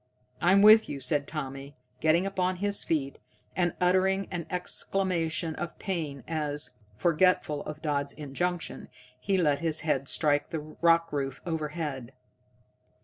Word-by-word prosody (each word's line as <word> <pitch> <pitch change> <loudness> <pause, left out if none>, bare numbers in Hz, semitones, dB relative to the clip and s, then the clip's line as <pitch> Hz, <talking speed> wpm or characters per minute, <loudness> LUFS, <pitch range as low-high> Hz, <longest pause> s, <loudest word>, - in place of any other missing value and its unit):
"I'm 190 +3 +5
with 215 +1 +8
you," 140 - -4
said 140 +2 0
Tommy, 140 -2 -6 0.2
getting 160 +4 +3
upon 185 -1 0
his 200 +2 +1
feet, 140 -4 -1 0.4
and 175 -2 +1
uttering 190 +2 +2
an 175 -3 -4
exclamation 180 -3 -1
of 170 -2 -5
pain 155 -8 -4
as, 150 -5 -2 0.2
forgetful 165 - +2
of 155 +1 -7
Dodd's 145 -2 -1
injunction, 165 +5 -3 0.3
he 190 +10 0
let 150 -5 +2
his 160 -1 -2
head 140 -4 0
strike 145 -2 +2
the 160 - -3 0.2
rock 165 -1 +4
roof 135 -2 -2
overhead. 150 -6 -4
160 Hz, 135 wpm, -28 LUFS, 145-180 Hz, 0.4 s, with